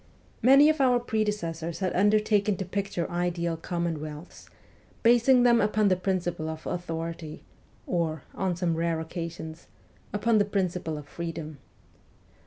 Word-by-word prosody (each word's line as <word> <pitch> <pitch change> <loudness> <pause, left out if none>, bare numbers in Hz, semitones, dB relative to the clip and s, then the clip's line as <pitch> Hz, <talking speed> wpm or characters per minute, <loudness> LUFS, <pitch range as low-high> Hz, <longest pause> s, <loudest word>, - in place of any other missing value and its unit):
Many 275 +5 +7
of 310 -2 +2
our 250 -2 +4
predecessors 205 -8 -2
had 185 -2 -1
undertaken 210 0 +3
to 190 - -3
picture 190 -2 -2
ideal 175 -1 -1
commonwealths, 160 -2 -5 0.5
basing 240 +2 +5
them 235 -1 +5
upon 215 -1 +2
the 185 - +4
principle 180 -4 -2
of 160 0 -7
authority, 165 -2 -5 0.4
or, 160 -4 -1
on 190 -2 -1
some 170 -1 0
rare 165 0 0
occasions 160 -1 -6 0.4
upon 215 +2 +2
the 205 - +3
principle 180 -5 -2
of 145 -1 -9
freedom. 160 -3 -6
175 Hz, 130 wpm, -27 LUFS, 165-210 Hz, 0.5 s, Many